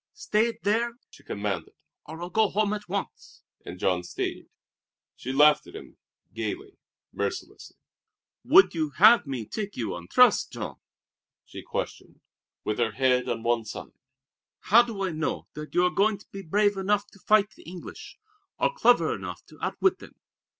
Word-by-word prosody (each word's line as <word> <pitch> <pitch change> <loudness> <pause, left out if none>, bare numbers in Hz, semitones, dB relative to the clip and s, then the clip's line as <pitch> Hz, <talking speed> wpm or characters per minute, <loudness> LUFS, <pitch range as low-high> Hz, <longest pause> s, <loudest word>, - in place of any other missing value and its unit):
"Stay 230 - 0
there!" 230 +3 0
she - - -17
commanded, 100 -5 -4 0.3
"or 160 +3 -7
I'll 175 - -6
go 220 -2 +3
home 210 0 +1
at 210 -3 -6
once!" 195 0 -6 0.2
And 90 - -8
Jean 90 -1 +1
stayed. 90 - -5 0.7
She 130 - -6
laughed 150 +2 +5
at - - -12
him 420 - -11 0.4
gayly, 390 +2 -5 0.3
mercilessly. - - -5 0.7
"Would 385 +4 +6
you 160 -3 -1
have 215 -2 +7
me 130 -5 -4
take 205 - -5
you 115 - -2
on 85 0 -8
trust, - - +4
Jean?" - - -6 0.7
she - - -9
questioned, - - -6 0.4
with 105 - -2
her 115 -2 +1
head 125 0 +2
on 115 -1 -3
one 120 -1 +1
side. 110 - -8 0.7
"How 225 +5 +6
do 225 -5 -4
I 190 - -1
know 155 0 -3
that 150 0 -9
you 180 - +4
are 180 - +2
going 205 +1 +2
to 200 - -18
be 195 - -7
brave 205 +3 +1
enough 200 +1 +1
to 200 - -18
fight 210 +1 +3
the - - -18
English, 180 -1 -10 0.4
or - - +1
clever - - +4
enough - - -7
to - - -16
outwit 385 - +1
them? - - -14
195 Hz, 170 wpm, -27 LUFS, 130-215 Hz, 0.7 s, have